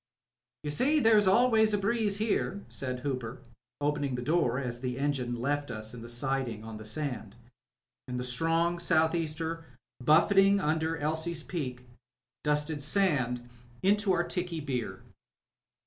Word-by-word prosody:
"You 150 - -2
see 280 - +3
there's 220 -5 +5
always 220 0 +4
a - - +1
breeze 205 0 +1
here/' 205 -2 -1
said 125 -2 -4
Hooper, 130 -3 -3 0.4
opening 145 -2 0
the 125 - -4
door 150 -5 +2
as 125 -3 -3
the 125 0 -3
engine 135 -4 -1
left 145 +3 -1
us 110 +1 -5
in 120 - -8
the 115 - -9
siding 120 -2 -2
on 110 -1 -8
^he 110 - -9
sand, 115 -5 -4 0.7
knd 125 - -3
the 125 - -2
strong 165 +7 +1
south 160 -2 +3
easter 165 0 -2 0.4
buffeting 195 +7 +5
under 160 -1 0
Elsie's 160 +2 -2
Peak 125 -9 -5 0.6
dusted 150 0 0
sand 140 -8 +1 0.4
into 205 +1 +3
our 175 -1 +2
tickey 175 -2 -3
beer. 130 -5 -4
150 Hz, 145 wpm, -30 LUFS, 125-175 Hz, 0.7 s, there's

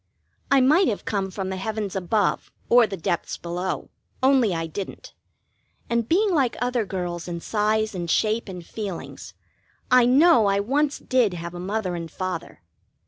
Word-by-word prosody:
I 275 -1 +5
might 310 +8 +5
have 210 - -2
come 195 -2 -1
from 190 0 -4
the 190 - -3
heavens 210 0 -3
above 195 +2 0 0.2
or 240 -1 +6
the 195 -2 -5
depths 170 0 -2
below, 175 +2 -4 0.3
only 260 -5 +4
I 165 -1 -2
didn't, 185 +4 -7 0.8
and 235 -1 0
being 400 +4 +3
like 270 -7 +1
other 245 -2 0
girls 175 -3 -4
in 170 -1 -4
size 215 +3 0
and 175 -2 -4
shape 215 +4 +1
and 180 -2 -8
feelings, 200 -4 -7 0.6
I 250 -1 +6
know 270 -3 +5
I 200 0 +2
once 280 +7 0
did 240 -8 +1
have 170 0 -6
a 175 - -7
Mother 190 0 -2
and 170 -1 -5
Father. 185 - -5
205 Hz, 165 wpm, -24 LUFS, 180-245 Hz, 0.8 s, or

